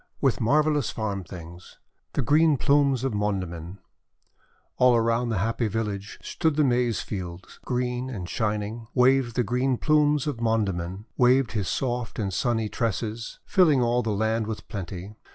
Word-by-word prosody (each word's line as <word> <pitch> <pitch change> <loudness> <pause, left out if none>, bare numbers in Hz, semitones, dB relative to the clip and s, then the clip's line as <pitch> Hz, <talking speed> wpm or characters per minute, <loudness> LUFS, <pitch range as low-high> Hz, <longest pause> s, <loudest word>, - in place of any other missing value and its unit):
WITH 135 -3 +1
MARVELLOUS 150 +4 +2
FARM 100 -3 -3
THINGS 85 0 -11 0.4
THE 140 - 0
GREEN 150 +4 +4
PLUMES 140 -2 +3
OF 135 -3 -1
MONDAMIN 95 -4 -3 1.0
All 125 -1 +5
around 115 +1 +1
the 110 - 0
happy 115 +4 0
village 105 -2 -3
Stood 160 -3 0
the 155 - +3
Maize 125 -4 +1
fields, 90 -3 -7
green 125 0 -2
and 95 -9 -5
shining, 110 +2 -2
Waved 125 -1 +3
the 125 - +2
green 125 +3 0
plumes 150 -1 +3
of 140 -6 -3
Mondamin, 100 -4 -1
Waved 125 0 +4
his 105 -4 -2
soft 125 -3 -2
and 100 -4 -2
sunny 115 +1 0
tresses, 115 0 -3
Filling 155 -9 +4
all 120 +1 +2
the 110 - -3
land 110 +1 0
with 110 -1 -6
plenty. 95 -1 -6
115 Hz, 150 wpm, -26 LUFS, 105-130 Hz, 1.0 s, All